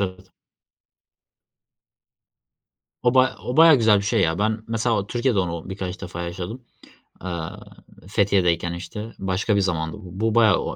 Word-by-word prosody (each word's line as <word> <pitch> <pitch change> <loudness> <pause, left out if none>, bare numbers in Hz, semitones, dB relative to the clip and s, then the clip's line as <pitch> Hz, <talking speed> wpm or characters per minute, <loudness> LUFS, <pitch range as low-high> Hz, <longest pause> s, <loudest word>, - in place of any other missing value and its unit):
evet. 95 -1 -4 2.7
O 120 0 +2
bayağ 130 0 +4
o 125 - -3
bayağı 160 -1 +8
güzel 110 -4 +4
bir - - -3
şey 105 +1 +1
ya, 80 -3 +1
ben 110 +1 -1
mesela 115 -2 0
Türkiye'de 120 -1 0
onu 85 -1 -3
birkaç 95 -1 -5
defa 90 -2 -6
yaşadım. 90 +8 -6 0.6
Eee, 95 - -4 0.8
Fethiye'deyken, 90 -4 +1
işte, 105 +6 -7
başka 95 +3 0
bir 100 - +3
zamandı 80 -2 -2
bu. 105 +4 -2
Bu 115 - +6
a - - +6
e 105 - +5
o - - -3
bayağı - - -4
100 Hz, 155 wpm, -23 LUFS, 90-115 Hz, 2.7 s, bayağı